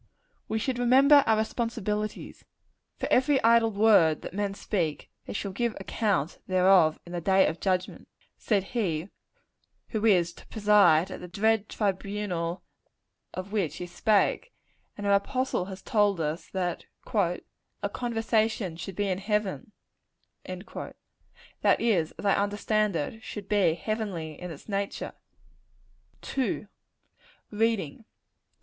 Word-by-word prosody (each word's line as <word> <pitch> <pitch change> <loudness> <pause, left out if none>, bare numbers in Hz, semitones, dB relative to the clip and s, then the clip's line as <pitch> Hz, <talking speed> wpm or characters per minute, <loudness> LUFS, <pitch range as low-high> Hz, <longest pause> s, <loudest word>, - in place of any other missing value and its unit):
We 220 - 0
should 245 +2 -2
remember 270 +4 +6
our 220 -1 +4
responsibilities. 215 -2 -3 0.5
"For - - -3
every 265 +2 +4
idle 230 0 +5
word 200 -7 +4
that - - -7
men 200 0 -2
speak, 170 -8 -2 0.2
they - - -5
shall 200 -1 -3
give 235 +3 -1
account 195 -5 -1
thereof 185 -4 +4
in 175 - -11
the 175 -1 -3
day 190 +2 +4
of 165 - -2
judgment" 185 -1 -2 0.3
said 205 -4 0
He 185 -7 -1 0.8
who 220 -2 -2
is 180 -6 +3
to - - -16
preside 205 -6 +4
at - - -6
the 180 - -8
dread 215 +3 +1
tribunal 195 -3 -2 0.7
of 185 +2 -6
which 200 -8 -1
he 180 - -5
spake: 205 - +1 0.5
and 205 - -5
an 200 - +3
apostle 255 0 0
has 190 -1 -9
told 205 -5 +2
us, 155 +2 -3
that 180 -2 -3 0.3
"our 180 -5 +1 0.5
conversation 225 -6 0
should 185 +2 -7
be 205 +1 0
in 185 -1 -1
heaven;" 210 +2 -2 0.7
that - - -4
is, 185 -9 +1
as - - -9
I 200 - +4
understand 205 0 0
it, 165 +8 -3
should 210 -4 -7
be 200 -6 +3
heavenly 175 -5 -4
in 180 - -5
its 155 -4 -10
nature. 200 -1 -3 1.2
II. 255 -5 -1 0.9
_Reading. 220 -3 -1
200 Hz, 130 wpm, -28 LUFS, 180-220 Hz, 1.2 s, remember